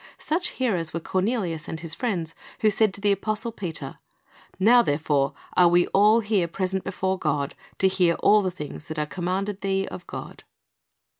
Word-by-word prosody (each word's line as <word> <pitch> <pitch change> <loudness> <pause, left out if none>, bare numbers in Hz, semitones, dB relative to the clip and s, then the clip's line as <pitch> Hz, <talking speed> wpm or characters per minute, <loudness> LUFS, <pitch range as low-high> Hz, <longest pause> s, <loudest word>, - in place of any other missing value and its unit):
Such 345 +3 -1
hearers 180 -12 -1
were - - 0
Cornelius 185 -3 -1
and 160 - -5
his 165 -1 -6
friends, 175 -9 -2 0.3
who 215 -2 +4
said 215 0 +3
to 200 - -11
the 205 0 +3
apostle 215 +3 -1
Peter, 165 -10 -5 0.3
" - - -27
Now 235 +5 +6
therefore 145 - +1 0.2
are 180 - +6
we 175 +1 +4
all 210 +3 +5
here 205 -5 +1
present 190 +2 -2
before 190 0 -2
God, 140 -5 -1 0.2
to 190 - +4
hear 180 -3 +2
all 205 -2 +4
things 155 -2 -8
that 160 -1 -6
are 150 - 0
commanded 190 +5 -3
thee 195 0 0
of 180 - -9
God." - - -8
190 Hz, 175 wpm, -25 LUFS, 165-210 Hz, 0.3 s, Now